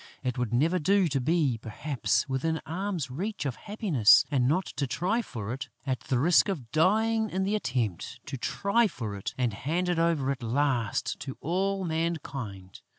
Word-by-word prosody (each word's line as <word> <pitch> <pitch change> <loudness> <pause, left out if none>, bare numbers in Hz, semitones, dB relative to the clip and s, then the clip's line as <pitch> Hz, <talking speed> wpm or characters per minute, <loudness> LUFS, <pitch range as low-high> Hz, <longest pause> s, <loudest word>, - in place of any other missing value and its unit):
It 125 -2 -1
would 125 -4 -2
never 160 +9 +2
do 195 +3 +3
to 135 -2 0
be, 145 -4 +1
perhaps, 125 +5 -1
within 155 +5 -1
arm's 170 -4 -3
length 195 +7 -3
of 130 -4 -1
happiness 195 - +4
and 130 -3 +2
not 180 +6 +2
to 140 - -3
try 195 - 0
for 110 - -5
it, 135 0 -6 0.2
at 130 -2 -1
the 130 - -1
risk 165 +9 +4
of 135 -12 -4
dying 220 +6 +2
in 190 +1 -1
the 200 +2 0
attempt, 125 - -2
to 140 - -5
try 200 - +1
for 110 - -5
it 100 - -5
and 125 -4 0
hand 165 - -1
it 175 -2 +1
over 165 -5 +2
at 135 -1 -4
last 120 -1 0
to 135 - -6
all 190 +4 -1
mankind! 140 - -4
145 Hz, 180 wpm, -28 LUFS, 125-185 Hz, 0.2 s, happiness